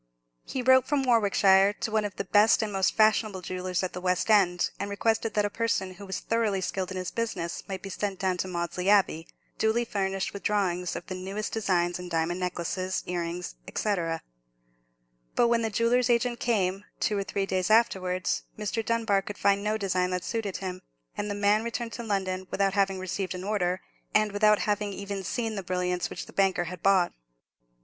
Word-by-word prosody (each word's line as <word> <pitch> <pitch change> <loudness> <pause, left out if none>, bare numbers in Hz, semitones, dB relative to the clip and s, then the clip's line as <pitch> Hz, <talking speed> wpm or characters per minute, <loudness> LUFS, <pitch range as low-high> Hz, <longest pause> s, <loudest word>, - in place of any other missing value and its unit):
He 260 - -3
wrote 260 0 +5
from 285 -2 +1
Warwickshire 200 -4 +4
to 215 - -4
one 215 -1 +1
of 205 - -5
the - - -2
best 210 +3 +4
and 210 -2 -3
most 190 -1 +1
fashionable 215 -3 +3
jewellers 185 0 -2
at 185 - -3
the 180 - -5
West 180 +3 +1
End, 180 -4 +3
and 200 +1 -3
requested 220 +2 0
that 210 -1 +3
a - - 0
person 195 -5 -1
who 195 +2 -11
was 190 - -3
thoroughly 225 -4 0
skilled 185 0 -2
in 185 - -5
his 185 -1 -3
business 225 -7 -3
might 190 -1 -5
be 195 - -6
sent 195 0 -3
down 185 -1 0
to 185 - -2
Maudesley 180 +1 -2
Abbey, 190 -5 +3 0.3
duly 220 +2 +2
furnished 195 -3 -2
with 200 - -6
drawings 180 -4 0
of - - -6
the - - -5
newest 195 +3 -4
designs 180 -5 +1
in 180 0 -7
diamond 165 +1 0
necklaces, 185 +1 -2
earrings, 175 0 -3 0.2
&c. 210 -2 +1 1.4
But 235 - +4
when 235 -1 +3
the 225 - 0
jeweller's 230 +3 +2
agent 240 0 +2
came, 195 -4 0 0.2
two 210 - +1
or 200 - 0
three 195 0 -2
days 185 -2 -1
afterwards, 190 -5 +2 0.2
Mr. 215 +2 -2
Dunbar 225 -3 +1
could 205 +1 -7
find 200 0 +2
no 215 +1 0
design 185 -3 0
that 180 -1 -2
suited 215 -4 -2
him; 185 -1 -5 0.3
and 210 - -3
the 205 - -2
man 205 +2 +3
returned 235 0 -4
to 235 - -5
London 190 -3 -2
without 195 -1 +1
having 195 -1 +2
received 185 0 -3
an 180 - -6
order, 190 -3 0 0.3
and 215 -1 +4
without 210 +1 +4
having 205 -1 -1
even 200 0 -5
seen 225 +3 -2
the 200 - -3
brilliants 180 -1 -1
which - - -6
the - - -14
banker 190 -2 +2
had 175 0 -7
bought. 190 -3 +3
195 Hz, 200 wpm, -28 LUFS, 185-215 Hz, 1.4 s, wrote